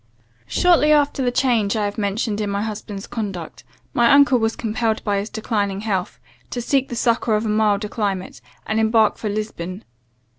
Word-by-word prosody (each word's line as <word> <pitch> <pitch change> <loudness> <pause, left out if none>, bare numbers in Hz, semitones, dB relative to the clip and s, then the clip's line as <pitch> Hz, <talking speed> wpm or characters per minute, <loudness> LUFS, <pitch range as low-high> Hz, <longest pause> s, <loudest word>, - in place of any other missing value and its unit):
"Shortly 340 -4 +4
after 290 -2 +3
the 250 - +2
change 245 -5 +1
I 215 -1 0
have 205 +1 -4
mentioned 210 +1 -1
in 205 - -2
my 200 +1 -1
husband's 210 -2 -6
conduct, 195 -8 -6 0.3
my 240 -4 +4
uncle 280 -3 +6
was 225 0 0
compelled 225 -1 -1
by 205 -2 0
his 205 +2 -4
declining 205 -3 -2
health, 195 -4 -2 0.3
to 245 - -4
seek 270 +2 0
the 240 - -4
succour 230 -2 +1
of 210 +2 -1
a - - -1
milder 210 -1 +2
climate, 200 -4 -3 0.2
and 215 +1 0
embark 220 -1 +3
for 215 - -3
Lisbon. 200 -2 -5
220 Hz, 180 wpm, -21 LUFS, 205-235 Hz, 0.3 s, uncle